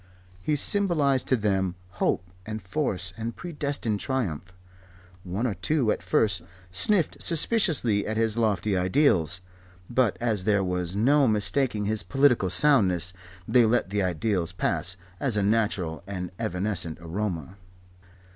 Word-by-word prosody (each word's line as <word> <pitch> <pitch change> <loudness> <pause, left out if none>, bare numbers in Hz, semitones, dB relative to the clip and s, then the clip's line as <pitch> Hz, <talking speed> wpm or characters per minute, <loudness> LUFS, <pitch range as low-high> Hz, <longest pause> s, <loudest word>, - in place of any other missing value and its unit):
He 150 +11 0
symbolized 150 -6 +2
to 130 - +3
them 95 -5 0 0.3
hope 90 - +1 0.2
and 110 +2 -5
force 95 - -3
and 115 +1 -4
predestined 145 -10 -2
triumph. 95 - -3 0.7
One 95 +6 -3
or 115 - 0
two 135 -2 +1
at - - -2
first 95 +1 +2 0.3
sniffed 175 - +2
suspiciously 155 - +2
at 110 0 -2
his 110 -1 +1
lofty 105 -3 0
ideals; 90 - +2 0.5
but 120 -4 +2
as 110 -6 -1
there 100 -2 +2
was 90 -1 -2
no 135 +6 +4
mistaking 110 +1 +1
his 110 +1 +1
political 125 -1 +2
soundness, 90 - +3 0.3
they 125 -2 +5
let 110 -4 +1
the 105 0 0
ideals 90 0 -1
pass, 90 0 -2 0.2
as 125 -6 0
a 105 - +1
natural 100 -6 0
and 90 -3 -5
evanescent 90 -3 -1
aroma. 85 -1 -4
105 Hz, 135 wpm, -26 LUFS, 90-125 Hz, 0.7 s, they